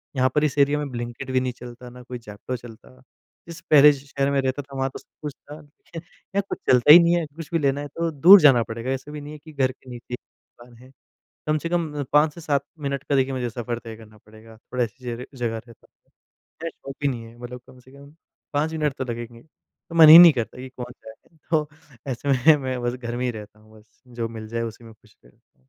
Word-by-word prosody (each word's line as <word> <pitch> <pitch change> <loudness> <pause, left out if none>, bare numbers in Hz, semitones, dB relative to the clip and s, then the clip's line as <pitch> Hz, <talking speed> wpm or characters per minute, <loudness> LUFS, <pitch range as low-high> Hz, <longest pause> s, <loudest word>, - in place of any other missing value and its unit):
यहाँ 130 0 +2
पर 150 - +3
इस 150 -1 -1
एरिया 145 +1 +3
में 145 -2 -4
ब्लिंकिट 120 +2 -6
भी 130 - +2
नहीं 130 -1 -2
चलता, 125 0 -11
ना 125 +1 -13
कोई 125 0 -8
ज़ेप्टो 110 +3 -7
चलता। 85 - -15 0.5
इससे 170 0 -10
पहले 150 0 +8
जिस 140 0 -9
शहर 140 0 0
में 140 - +1
रहता 130 +2 -2
था 135 0 -14
वहाँ 135 0 0
तो - - -10
सब - - -27
कुछ 150 -2 -5
था 145 +2 -13 0.4
यहाँ 180 +4 -5
कुछ - - -3
चलता 125 +3 +6
ही 170 - +11
नहीं 170 +1 +3
है, 170 -2 0
कुछ 150 +1 -11
भी 165 - +2
लेना 140 0 0
है 145 - -6
तो 165 +3 -3
दूर 175 +7 +8
जाना 130 -6 +6
पड़ेगा। 115 +4 -5
ऐसा 135 +3 -5
भी 150 -1 -7
नहीं 150 +1 -9
है 150 - -10
कि 155 +1 -15
घर 130 -2 +1
के 130 0 -18
नीचे 125 0 -7
दुकान 120 0 -20
है। 130 - -17 0.6
कम 155 0 +1
से 165 - -4
कम 160 -4 -2
5 150 +1 +4
से 170 - -11
7 140 -3 -1 0.2
मिनट 140 -1 -3
का 145 - -1
देखिए 135 0 +1
मुझे 125 -2 -2
सफर 120 +1 -4
तय 115 -2 -10
करना 110 -1 -16
पड़ेगा। 110 +1 -16
थोड़ा 125 +2 -4
ऐसी 125 +3 -11
जगा 120 +1 -5
जगह 120 -3 -3
रहता 115 -2 -18
हूँ। - - -44 0.5
ज्यादा 165 0 -4
शॉप 135 -2 -11
भी 145 - +2
नहीं 120 -3 -4
है। 115 +1 -14
मतलब 125 0 -8
कम 130 -1 -17
से 130 +2 -20
कम 140 +1 -15 0.4
5 155 +2 0
मिनट 150 -3 -1
तो 130 - -2
लगेंगे। 120 -1 -7
तो 160 +2 -19
मन 160 -2 +8
ही 160 +2 +12
नहीं 175 -2 +10
करता 120 -1 -4
कि 130 +1 -8
कौन 125 -1 -8
जाएगा? 110 +9 -15
तो 155 -2 +1 0.4
ऐसे 130 +3 -5
में 140 +3 +5
मैं 130 -1 -3
बस 120 0 -1
घर 120 -1 -6
में 125 - -2
ही 125 - 0
रहता 105 -1 -11
हूँ 110 0 -19
बस 105 - -26
जो 115 -1 -2
मिल 110 -1 -9
जाए 115 +1 -3
उसी 115 +1 -7
में 115 - -13
खुश - - -26
रहता 65 - -27
हूँ। 65 +1 -36
130 Hz, 255 wpm, -23 LUFS, 120-150 Hz, 0.6 s, ही